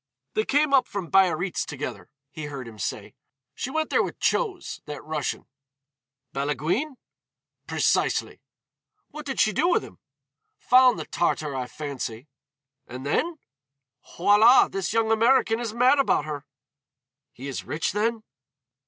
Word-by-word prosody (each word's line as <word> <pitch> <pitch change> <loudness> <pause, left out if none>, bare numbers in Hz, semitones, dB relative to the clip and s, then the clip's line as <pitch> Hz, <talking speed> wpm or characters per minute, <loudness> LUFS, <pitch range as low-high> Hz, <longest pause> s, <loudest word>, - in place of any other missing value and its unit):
"They 215 - 0
came 290 0 +2
up 260 -2 +5
from 190 -5 -5
Biarritz 185 -1 +2
together," 145 -1 -6 0.2
he 155 -1 -6
heard 140 -4 -7
him 110 -2 -12
say. - - -4 0.4
"She 245 - -4
went 315 +3 -2
there - - +4
with - - -4
Chose, 390 -7 -1
that 150 -1 -7
Russian." 150 -2 -3 0.9
"Balaguine?" 155 - -1 0.7
"Precisely." - - 0 0.7
"What 305 -1 -8
did 270 - -3
she 215 - +3
do 320 - +2
with 365 - +2
him?" - - -13 0.6
"Found 255 -1 +5
the - - -5
Tartar, 150 -4 -1
I 130 -1 -3
fancy." 135 -4 -6 0.6
"And 130 +2 -8
then?" 320 - 0 0.8
"Voilà, 210 +7 +6
this 195 0 -2
young 225 0 +1
American 230 0 +3
is 235 -2 -3
mad 250 +5 +4
about 265 - +2
her." 145 -2 -6 0.8
"He 135 -1 -9
is 135 - -4
rich 160 - -2
then?" 220 +2 -1
205 Hz, 140 wpm, -25 LUFS, -, 0.9 s, Voilà